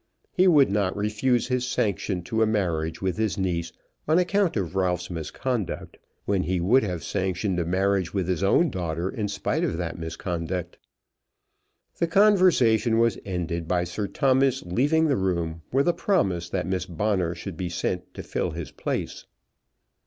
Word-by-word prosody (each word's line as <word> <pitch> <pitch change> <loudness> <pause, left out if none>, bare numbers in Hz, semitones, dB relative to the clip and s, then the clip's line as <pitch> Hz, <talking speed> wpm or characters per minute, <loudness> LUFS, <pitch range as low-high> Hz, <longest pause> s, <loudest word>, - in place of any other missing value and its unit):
He 185 0 +3
would 145 - +5
not 100 -2 0
refuse 105 +4 +1
his 125 -1 0
sanction 100 -6 -1
to 110 +5 -1
a 110 - +4
marriage 85 -6 -1
with 95 -2 -1
his 110 -3 0
niece 85 -3 -1 0.4
on 155 +2 +4
account 180 - +2
of 90 -2 -3
Ralph's 90 -1 0
misconduct, 95 - -4 0.3
when 100 -2 +1
he 90 0 -1
would 110 +10 +4
have 90 -7 -3
sanctioned 95 0 -1
a 85 - -1
marriage 95 +1 +1
with 95 -4 -1
his 90 -2 -1
own 140 - +3
daughter 85 0 -2
in 110 -5 -2
spite 100 -1 -1
of 80 - -1
that 85 0 -4
misconduct. 85 +2 -4 1.2
The 170 - +2
conversation 165 - +4
was 115 -3 +2
ended 85 -3 -3
by 90 0 +1
Sir 90 +4 -3
Thomas 135 +2 +2
leaving 145 - +2
the 145 -3 +2
room 85 -4 -1
with 135 +4 +2
a 175 - +4
promise 95 - 0
that 90 0 -2
Miss 95 0 -2
Bonner 90 -1 0
should 90 +1 -7
be 90 +1 -3
sent 85 - -3
to - - -6
fill - - -2
his - - -6
place. - - -4
95 Hz, 165 wpm, -25 LUFS, 90-120 Hz, 1.2 s, would